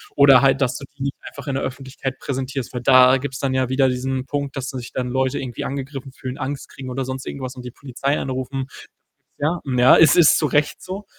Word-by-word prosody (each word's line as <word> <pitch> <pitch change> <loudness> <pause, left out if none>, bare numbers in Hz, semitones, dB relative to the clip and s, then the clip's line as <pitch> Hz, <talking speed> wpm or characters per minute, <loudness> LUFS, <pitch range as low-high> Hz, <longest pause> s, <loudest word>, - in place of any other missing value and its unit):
Oder 140 -2 +7
halt, 135 0 +3
dass 125 -1 +1
du 140 - -9
die 135 - -5
nicht 140 - -2
einfach - - -10
in 140 - -1
der 135 - -2
Öffentlichkeit 130 0 -5
präsentierst, 135 -1 -4
weil 125 - -4
da 130 +1 +6
gibt's 130 -1 -5
dann 135 -1 -1
ja 130 -1 0
wieder 130 0 +3
diesen 130 +1 -2
Punkt, 140 -1 -3
dass 135 0 -4
sich 125 -3 -7
dann 125 -1 -2
Leute 130 +1 0
irgendwie 125 -3 -5
angegriffen 135 0 -5
fühlen, 130 0 -7
Angst 140 +1 -5
kriegen 130 -1 -9
oder 130 +1 -3
sonst 130 +1 -5
irgendwas 130 -1 -6
und 125 -1 -10
die 125 - -6
Polizei 140 +2 -2
anrufen. 130 0 -3 0.7
Ja, 160 +4 0
ja, 125 -2 +5
es 155 -3 +6
ist 170 -3 +6
zu 150 - +1
Recht 150 +1 0
so, 195 +3 -6
135 Hz, 225 wpm, -21 LUFS, 130-140 Hz, 0.7 s, Oder